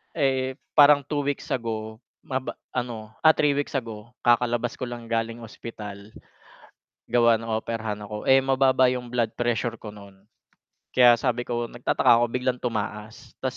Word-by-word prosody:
Eh, 130 -3 0 0.2
parang 145 -1 +7
2 145 +1 -3
weeks 145 0 -3
ago 110 -3 -3 0.2
maba 130 -1 -4 0.2
ano, 115 -3 -4
ah, 160 - +8
3 145 -2 +1
weeks 145 - -2
ago 115 -3 -5
kakalabas 120 0 +2
ko 130 - -4
lang 120 -1 -8
galing 115 0 -2
ospital. 105 -2 -9 1.0
Gawa 120 -1 +4
ng 115 0 -7
operahan 110 -1 -3
ako, 105 0 -6
eh, 135 0 +7
mababa 130 -1 +3
yung 125 -1 -4
blood 115 -3 0
pressure 120 -1 -1
ko 110 - -9
nun. 100 -2 -15 0.7
Kaya 120 -1 +7
sabi 120 -1 -1
ko 120 -1 -2
nagtataka 120 +1 -1
ako - - +4
biglang 125 0 -1
tumaas, 110 -1 -5
ta's 130 -1 -3
120 Hz, 155 wpm, -25 LUFS, 110-130 Hz, 1.0 s, ah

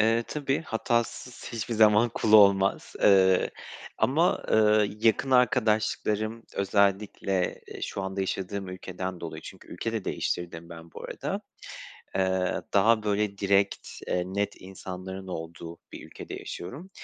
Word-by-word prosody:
Eee, 115 +2 +3
tabii. 140 -2 -1
Hatasız 120 -1 -2
hiçbir 115 0 -3
zaman 110 +1 +5
kul 110 - 0
olmaz, 100 -2 +5
eee, 95 -2 +5 0.5
ama, 160 +7 +2
ııı, 105 -1 +5
yakın 115 +4 +2
arkadaşlıklarım 110 -2 +1
özellikle, 100 -1 0
eee, - - -9
şu 100 - -3
anda 95 0 -3
yaşadığım 95 0 -3
ülkeden 95 0 -6
dolayı 85 - -7
Çünkü - - -12
ülke 115 +6 -4
de 110 -4 -3
değiştirdim 85 -1 -3
ben 85 -1 -11
bu - - -9
arada. - - -4 0.8
Eee, 95 -1 0
daha 110 +3 +4
böyle 105 -1 -1
direkt, 100 0 +1 0.2
eee, 90 - 0
net 100 +2 -2
insanların 95 0 -8
olduğu 85 -1 -7
bir - - -9
ülkede - - -9
yaşıyorum. 140 - -7
100 Hz, 130 wpm, -27 LUFS, 95-110 Hz, 0.8 s, zaman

